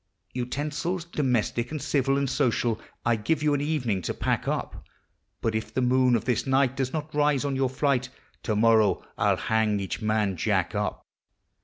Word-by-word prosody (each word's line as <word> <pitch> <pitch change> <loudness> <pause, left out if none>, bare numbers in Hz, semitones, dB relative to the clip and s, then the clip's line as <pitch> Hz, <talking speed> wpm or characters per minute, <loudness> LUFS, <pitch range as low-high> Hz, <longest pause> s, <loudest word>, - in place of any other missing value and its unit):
Utensils 150 +8 -3
domestic 125 -6 0
and 155 - -4
civil 135 -1 +1
and 140 0 0
social 120 -4 0 0.2
I 120 0 +3
give 140 +8 -1
you 150 -1 +3
an 140 - 0
evening 130 -10 -1
to - - -3
pack - - -1
up; - - -3 0.6
But 115 - 0
if 110 0 -3
the 130 - 0
moon 125 0 +4
of 115 - -1
this 125 +1 0
night 135 -1 +2
does 130 -1 -1
not 155 +1 -4
rise 145 -2 +2
on 140 -1 -1
your 130 -1 +1
flight, 130 -1 0 0.3
To 110 - -1
morrow 110 -3 +4
I - - +1
'11 - - +1
hang 110 -2 +1
each 95 +1 -4
man 105 -3 0
Jack - - 0
up. - - -2
130 Hz, 185 wpm, -26 LUFS, 110-145 Hz, 0.6 s, moon